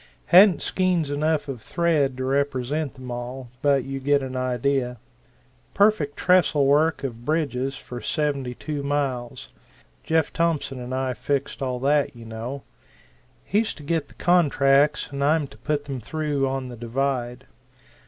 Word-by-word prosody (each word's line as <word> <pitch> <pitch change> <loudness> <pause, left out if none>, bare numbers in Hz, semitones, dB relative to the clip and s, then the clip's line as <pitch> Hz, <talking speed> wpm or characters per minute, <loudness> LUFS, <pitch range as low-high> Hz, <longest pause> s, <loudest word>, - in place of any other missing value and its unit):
Hadn't 185 +1 +6
skeins 180 -6 0
of 145 - -2 0.4
thread 170 +5 +1
enough 130 - -14
to 130 - -2
represent 140 +1 -1
them 130 -2 -9
all 120 +1 -6
but 140 -2 +3
you 135 +1 -5
get 140 +1 +2
an 130 -1 -5
idea 130 0 0 0.8
perfect 200 -8 +3
trestle 180 -6 +3
work 150 +2 +3
of 120 -3 -5
bridges 135 -3 -1
for 125 -1 -8
seventy 140 -5 -1
two 150 +1 -4
miles: 140 -4 -3 0.5
Jeff 160 -1 +1
Thompson 160 -6 0
and 125 0 -7
I 130 -1 -1
fixed 140 +3 -2
all 130 -2 -1
that, 145 -1 +2
you 115 -1 -11
know; 115 +5 -6 0.8
he's 215 +2 0
to 150 - -12
get 155 -1 -1
the - - -20
contracts 145 -5 +3
and 140 0 -2
I'm 150 +1 +3
to - - -14
put 150 -2 -2
them 135 -2 -4
through 145 +1 -1
on 135 -1 -3
the 120 - -8
divide. 125 +1 -2
140 Hz, 155 wpm, -24 LUFS, 130-150 Hz, 0.8 s, Hadn't